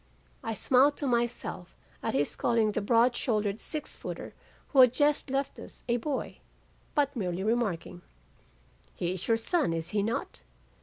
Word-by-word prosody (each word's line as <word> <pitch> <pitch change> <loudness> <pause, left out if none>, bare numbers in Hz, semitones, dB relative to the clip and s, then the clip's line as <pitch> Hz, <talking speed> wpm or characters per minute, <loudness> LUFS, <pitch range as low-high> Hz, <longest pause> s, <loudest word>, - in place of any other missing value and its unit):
"I 225 -1 -2
smiled 270 +6 +4
to 290 - -3
myself 235 -7 -2 0.2
at - - -2
his 145 +1 0
calling 230 -3 +2
the 215 - -1
broad 235 +3 +4
shouldered 210 -4 0
six 305 -2 -4
footer - - -7 0.4
who 270 - +6
had 250 -2 +7
just 290 0 +2
left 275 +1 -2
us - - -11
a 240 0 +2
boy, 270 +3 -3 0.6
but 285 -2 +2
merely 185 -4 -2
remarking, 200 -6 -1 0.9
'He 175 +1 -1
is 185 0 -6
your 230 - +4
son 295 - +1
is 165 0 -3
he 210 -1 +1
not! 220 - -3
230 Hz, 160 wpm, -29 LUFS, 200-260 Hz, 0.9 s, had